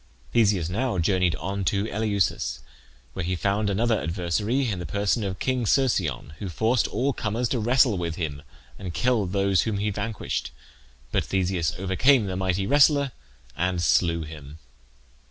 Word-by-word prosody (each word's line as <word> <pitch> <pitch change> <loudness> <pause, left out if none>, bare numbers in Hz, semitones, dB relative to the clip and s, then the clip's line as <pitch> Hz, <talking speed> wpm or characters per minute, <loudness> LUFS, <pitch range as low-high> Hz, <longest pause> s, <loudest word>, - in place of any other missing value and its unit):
Theseus 100 -8 +3
now 115 +4 -1
journeyed 90 -1 +2
on 95 +6 -3
to 100 0 +1
Eleusis, 100 - -1 0.5
where 95 - -4
he 90 +2 -1
found 100 +3 0
another 110 +3 +1
adversary 100 +10 -1
in 100 -5 -2
the 90 - -5
person 100 - 0
of 95 -1 -3
King 130 -3 -1
Cercyon, 95 - +1
who 100 - -4
forced 110 +8 +1
all 135 +2 0
comers 115 +2 -1
to 125 - 0
wrestle 120 -2 +3
with 85 -2 -3
him, 75 -5 -4 0.4
and 90 -3 -6
killed 115 -7 +1
those 100 -1 +2
whom 110 -3 -1
he 105 +1 -1
vanquished; 105 +2 -3 0.6
but - - +1
Theseus 90 -5 0
overcame 105 +7 +3
the 95 -1 -3
mighty 95 0 0
wrestler 140 +1 +4 0.4
and 90 +1 0
slew 85 +2 +2
him. 75 -1 -10
100 Hz, 155 wpm, -25 LUFS, 90-115 Hz, 0.6 s, wrestler